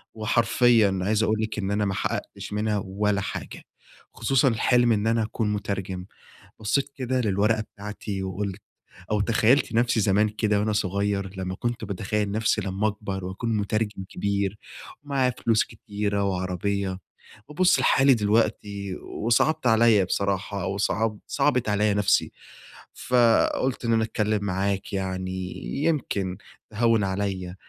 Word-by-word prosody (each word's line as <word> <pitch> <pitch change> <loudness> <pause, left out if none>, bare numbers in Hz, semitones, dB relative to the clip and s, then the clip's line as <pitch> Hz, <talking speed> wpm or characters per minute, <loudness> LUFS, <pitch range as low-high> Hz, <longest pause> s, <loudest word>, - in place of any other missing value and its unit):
وحرفيًا 110 -2 +3
عايز 110 +3 +1
أقول 110 0 +1
لك 110 0 -3
إن 100 -1 -2
أنا 105 0 +1
ما 100 - -1
حققتش - - -4
منها 105 -1 0
ولا 100 +1 0
حاجة، - - -6 0.5
خصوصًا 135 -1 +2
الحلم 120 +1 +3
إن 105 0 0
أنا 115 0 +2
أكون 110 -1 -2
مترجم. 100 -3 -4 0.5
بصيت 110 +6 0
كده 130 -1 -1
للورقة 105 +1 +1
بتاعتي 105 -2 -6
وقلت 95 +1 -4 0.5
أو 105 -1 +2
تخيلت 115 +5 +3
نفسي 120 0 +2
زمان 105 +1 +3
كده 105 -1 0
وأنا 105 +1 0
صغير 100 -1 -1
لما 95 0 -3
كنت 120 +2 -3
باتخيل 100 +1 -2
نفسي 110 +1 +1
لما 100 +2 -1
أكبر، 100 -3 -4
وأكون 110 +5 -2
مترجم 105 -1 -2
كبير 100 0 -1 0.5
ومعايا 135 -3 +1
فلوس 115 -1 +4
كتيرة 100 -2 -3
وعربية، 95 0 -2 0.5
وأبص 180 +5 +3
لحالي 135 0 +5
دلوقتي 100 -2 0
وصعبت 125 +6 0
عليَّ 110 -3 +5
بصراحة، 100 0 -2
وصعب 100 +2 -1
صعبت 135 -5 +1
عليَّ 105 0 +2
نفسي، 105 -1 +2 0.6
فقلت 125 +1 +2
إن 115 - +2
أنا 110 0 +3
أتكلم 105 -1 -1
معاك 100 +1 -2
يعني، 95 -1 -2 0.5
يمكن 100 - -1 0.3
تهوِّن 115 0 +2
عليَّ 95 -2 -2
105 Hz, 130 wpm, -25 LUFS, 100-115 Hz, 0.6 s, لحالي